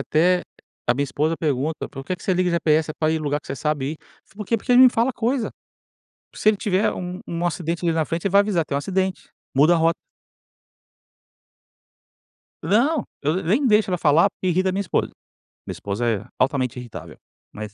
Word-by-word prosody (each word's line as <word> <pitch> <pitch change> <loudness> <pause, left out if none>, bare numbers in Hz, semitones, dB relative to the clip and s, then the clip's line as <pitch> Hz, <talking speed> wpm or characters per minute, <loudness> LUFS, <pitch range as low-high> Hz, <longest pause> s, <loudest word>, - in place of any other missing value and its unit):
até 175 +6 +2
a 120 - -5
a - - -6
minha 140 - 0
esposa 150 +4 -1
pergunta: 150 0 -2
"Por 135 - -9
que 185 - -2
que - - -17
você 190 - 0
liga 180 0 +1
GPS? 160 -2 +2
É - - -24
pra 155 0 +1
ir 160 - +1
em - - -1
lugar 145 -1 -1
que - - -19
você - - -4
sabe 150 0 -1
ir". - - -8 0.3
Falo: - - -27
"Por 210 - -5
quê? 230 - +2
Porque 250 +4 -1
ele 250 +1 +8
me 255 - +9
fala 240 +3 +1
coisa". 240 +1 -1 0.8
Se - - +1
ele 215 - +4
tiver 195 0 +1
um 180 +1 -6
um 170 +1 -2
acidente 170 0 -3
ali 165 - +2
na 160 -1 +1
frente 165 +3 -3
ele 195 - -1
vai 200 - +7
avisar: 200 -5 +1
"Tem 140 - -5
um - - +2
acidente. 190 +3 -2 0.3
Muda 150 +6 +5
a - - +3
rota". 165 0 +2 2.7
Não. 270 +7 +2 0.2
Eu 150 +4 0
ne 190 - -2
nem 220 - +1
deixo 210 -2 +3
ela 180 - 0
falar, 165 +4 +4
porque 185 - -5
irrita 185 +2 +2
minha 195 +2 -1
esposa. 190 - -1 0.5
Minha - - -5
esposa 100 +4 -3
é 105 -2 -2
altamente 130 -2 0
irritável. 120 -2 -10 0.3
Mas, 105 -1 -8
170 Hz, 215 wpm, -22 LUFS, 150-195 Hz, 2.7 s, me